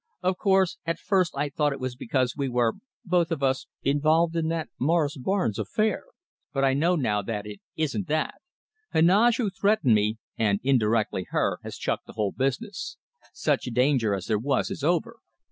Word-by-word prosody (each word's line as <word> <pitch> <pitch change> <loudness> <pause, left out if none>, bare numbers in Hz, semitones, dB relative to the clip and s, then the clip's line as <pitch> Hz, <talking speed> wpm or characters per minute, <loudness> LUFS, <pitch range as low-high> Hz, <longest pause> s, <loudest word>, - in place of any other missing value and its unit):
Of 185 0 0
course, 190 -3 +2
at 165 0 -2
first 185 -7 +1
I 145 +1 0
thought 145 +1 0
it 140 - -7
was 130 -1 -3
because 125 0 -1
we 140 -2 -1
were, 120 -2 +2 0.3
both 175 -2 +2
of 160 -5 -3
us, 130 -1 +1 0.2
involved 155 +4 +2
in 165 -1 0
that 165 -1 -2
Morris 155 +1 +2
Barnes 130 - -1
affair. 215 - 0 0.5
But 135 -1 0
I 135 - +3
know 165 +6 +2
now 105 -9 0
that 105 0 -4
it 105 -1 -9
isn't 160 +5 -1
that. 155 0 -1 0.5
Heneage, 205 +9 +4
who 220 -6 0
threatened 200 - +2
me, 105 +1 +2 0.2
and 100 -3 +2
indirectly 110 -7 +1
her, - - 0
has - - -7
chucked - - -2
the - - -11
whole 105 -3 -1
business. 195 - -3 0.3
Such - - 0
danger 125 -3 +2
as 95 -1 -5
there 110 -2 0
was 135 +3 0
is 145 - -5
over. 180 +9 0
145 Hz, 180 wpm, -26 LUFS, 120-170 Hz, 0.5 s, Heneage